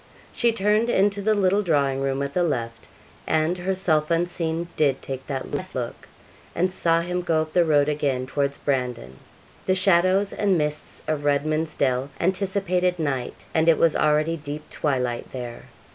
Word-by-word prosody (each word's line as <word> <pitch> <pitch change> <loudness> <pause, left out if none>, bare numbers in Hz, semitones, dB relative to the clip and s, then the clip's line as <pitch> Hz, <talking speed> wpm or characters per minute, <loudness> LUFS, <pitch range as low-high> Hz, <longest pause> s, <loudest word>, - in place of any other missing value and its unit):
She 235 -1 +2
turned 215 +2 +1
into 200 -2 +2
the 215 +2 +2
little 200 0 +2
drawing 140 -7 +1
room 135 0 -1
at 140 0 -4
the 180 - +1
left, 115 -9 -2 0.4
and, 160 +2 +1
herself 180 -4 0
unseen, 170 0 -1
did 140 -3 +2
take 135 -1 -7
that 135 -2 -4
last 185 0 -4
look, 120 -2 -5 0.5
and 180 +2 +1
saw 165 -2 +2
him 180 +1 -2
go 165 -3 +1
up 155 - -12
the 175 - +5
road 145 -3 +3
again 140 -4 0
towards 140 +1 -1
Brandon. 125 - -2 0.5
The 185 - +3
shadows 185 +1 +3
and 200 -3 +2
mists 150 -1 -3
of 155 -2 -1
Redman's 155 +2 0
Dell 130 0 0
anticipated 185 -1 +1
night, 140 -6 -3
and 160 +1 +3
it 165 - +5
was 165 -2 +3
already 155 +2 +2
deep 150 0 -7
twilight 125 -5 -2
there. 120 -2 -7
155 Hz, 165 wpm, -24 LUFS, 140-180 Hz, 0.5 s, the